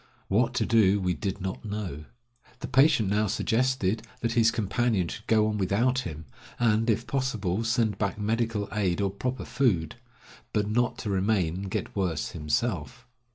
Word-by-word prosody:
What 120 +5 +2
to - - +1
do 105 -4 +4
we 90 -2 0
did 100 +1 -4
not 95 0 -4
know. 100 -8 -5 0.6
The - - -4
patient 135 -5 +4
now 105 +1 +2
suggested 115 -1 +1 0.2
that 115 - 0
his 115 -1 +4
companion 110 -3 0
should 105 - -8
go 110 -1 +4
on 105 -1 -1
without 115 +7 +2
him, 80 -9 -6 0.3
and, 115 -1 +2
if 115 +2 +1
possible, 115 -6 -1
send 115 -3 +1
back 100 -1 -1
medical 110 -1 -1
aid 100 -5 0
or 100 -1 +1
proper 125 +6 -3
food; 95 - 0 0.6
but 105 -1 +1
not 120 +2 +1
to 105 - -1
remain 95 -3 +1
and 95 +1 -5
get - - -4
worse 90 -6 -1
himself. 80 - -2
105 Hz, 165 wpm, -27 LUFS, 95-115 Hz, 0.6 s, do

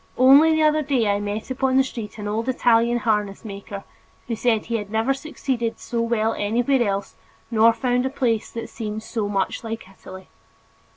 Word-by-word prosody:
Only 275 +5 +7
the 315 - +2
other 305 0 +3
day 265 -6 +1
I 200 0 +1
met 205 +4 -4
upon 260 0 +1
the 265 - +5
street 230 -5 -7
an 210 -1 -5
old 225 +4 -2
Italian 240 -1 +3
harness 210 -3 -1
maker, 200 -1 -7 0.4
who 235 - -2
said 225 -1 +1
that - - -18
he 230 0 -1
had 205 -2 -6
never 220 +5 +1
succeeded 265 -5 -3
so 235 -1 -3
well 225 -1 +1
anywhere 240 +6 +1
else 200 -3 -1 0.4
nor 225 0 +5
found 250 +2 0
a - - -2
place 235 -5 -1
that 230 - -6
"seemed 215 -1 -5
so 220 -3 -3
much 195 +1 -1
like 225 -3 -6
Italy." 190 0 -12
230 Hz, 190 wpm, -23 LUFS, 210-255 Hz, 0.4 s, Only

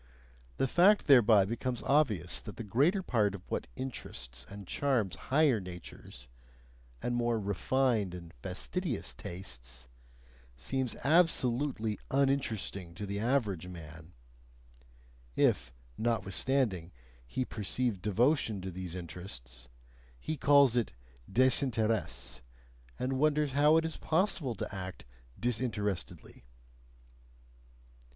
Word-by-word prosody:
The - - +2
fact 190 +9 +5
thereby 115 -7 +7
becomes 120 +3 -3
obvious 110 - +1
that 105 - -9
the 115 - -4
greater 145 - +2
part 105 - +1
of 95 - -10
what - - -2
interests 65 - -6
and 100 0 -9
charms 120 -9 0
higher 140 -4 +4
natures, 90 -8 -10 0.8
and 120 - 0
more 120 -1 +1
refined 105 -1 +1
and 85 -2 -10
fastidious 125 - -3
tastes, 65 -8 -9 0.7
seems 130 - -2
absolutely 130 - +2
"uninteresting" 115 -10 0
to 100 - -5
the 100 0 -3
average 110 -7 0
man 80 -1 -10 1.2
if, - - +2 0.3
notwithstanding, 110 -4 0 0.4
he 130 - -2
perceive 110 -1 -2
devotion 110 - +2
to 95 0 -5
these 90 -1 -5
interests, 70 -9 -8 0.5
he 155 - -3
calls 140 -3 +5
it 120 -2 0 0.4
desinteresse, 110 - +1 0.6
and 130 +1 -1
wonders 150 -1 +2
how 150 +3 +5
it 165 - +2
is 160 - -3
possible 160 - 0
to - - -5
act 95 -1 -6 0.3
"disinterestedly." 110 - -3
110 Hz, 105 wpm, -32 LUFS, 90-135 Hz, 1.2 s, thereby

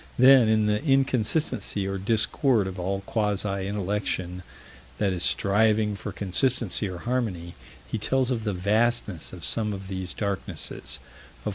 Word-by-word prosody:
Then, 130 -2 +7
in 110 -1 +3
the 105 +4 +1
inconsistency 135 -5 +1
or 95 0 -2
discord 110 +2 +2
of 95 0 -5
all 95 +2 -2
quasi 100 -2 -1
intellection 100 -3 -2 0.6
that 100 -3 +1
is 90 - -3
striving 105 +2 +2
for 100 - -6
consistency 105 +1 +1
or 90 - -6
harmony, 105 -9 -2 0.3
he 110 - -3
tells 130 +4 +1
of 115 -3 -1
the 105 -2 -1
vastness 105 -1 +1
of 85 -5 -8
some 105 +6 0
of 95 -1 -7
these 95 -2 -4
darknesses. 100 -3 -4
105 Hz, 140 wpm, -26 LUFS, 95-115 Hz, 0.6 s, Then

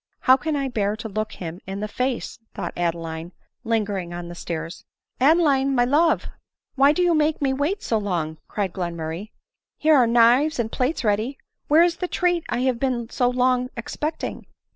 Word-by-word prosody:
" - - -49
How 260 - +6
can 300 +3 -2
1 275 -2 -1
bear 210 -2 0
to 225 +1 -6
look 215 +1 -3
him 170 0 -7
in 195 +1 -4
the 210 - -2
face 250 +3 -3
!" - - -49
thought - - -4
Adeline, 165 0 -3 0.3
lingering 205 -6 -1
on 175 0 -6
the - - -7
stairs. 165 -1 -6 0.2
" - - -52
Adeline, 275 -2 +4
my 245 -1 +4
love! 305 +6 +3 0.5
why 275 +1 +5
do 360 +4 +1
you 350 -1 +3
make 305 0 +2
me 270 -2 +1
wait 295 +9 -1
so 225 - +1
long 165 -6 -2
?" - - -50
cried 195 -4 -2
Glenmurray. 170 +1 -4 0.3
" - - -65
Here 315 +1 +4
are 250 -4 +5
knives 240 +6 +4
and 230 -2 -1
plates 260 +4 -1
ready; 220 +5 0 0.3
where 310 +3 +6
is 345 -1 +1
the 360 - -2
treat 350 -2 +1
I 245 - -1
have 255 -2 +1
been 245 -3 -1
so 245 -1 +2
long 250 0 +1
expecting?' 300 +7 -4
245 Hz, 205 wpm, -23 LUFS, 195-280 Hz, 0.5 s, How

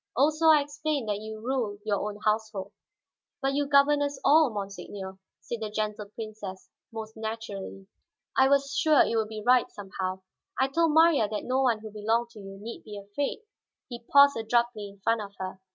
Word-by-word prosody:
Also 305 +5 +3
I 310 -2 +7
explained 290 -3 -3
that 205 -1 -1
you 220 0 -7
rule 235 -3 -2
your 205 -2 +1
own 210 0 -4
household." 215 -2 -1 0.7
"But 270 0 0
you 285 0 0
govern 285 +1 +4
us 285 -1 -2
all, 310 0 +6
monseigneur," 195 -1 -7 0.2
said 235 - -5
the 215 - -3
Gentle 210 0 -3
Princess, 215 -4 -8 0.2
most 220 -1 -7
naturally. 220 -3 -6 0.5
"I 265 0 +5
was 280 0 +2
sure 310 -2 +5
it - - -1
would 220 -1 0
be 215 -1 -6
right 250 -1 +4
somehow; 190 -1 -5 0.4
I 265 +1 +3
told 330 +2 +2
Marya 320 -9 +5
that 210 - -3
no 260 +1 0
one 235 -5 +2
who 215 -1 -8
belonged 225 +3 0
to 220 - -13
you 195 -1 -9
need 225 +3 -8
be 210 -2 -8
afraid." 205 - -4 0.5
He 240 -2 -6
paused 280 -1 +7
abruptly 225 -2 0
in 200 0 -18
front 230 -1 +2
of 200 -1 -9
her. 190 0 -6
220 Hz, 185 wpm, -28 LUFS, 205-275 Hz, 0.7 s, I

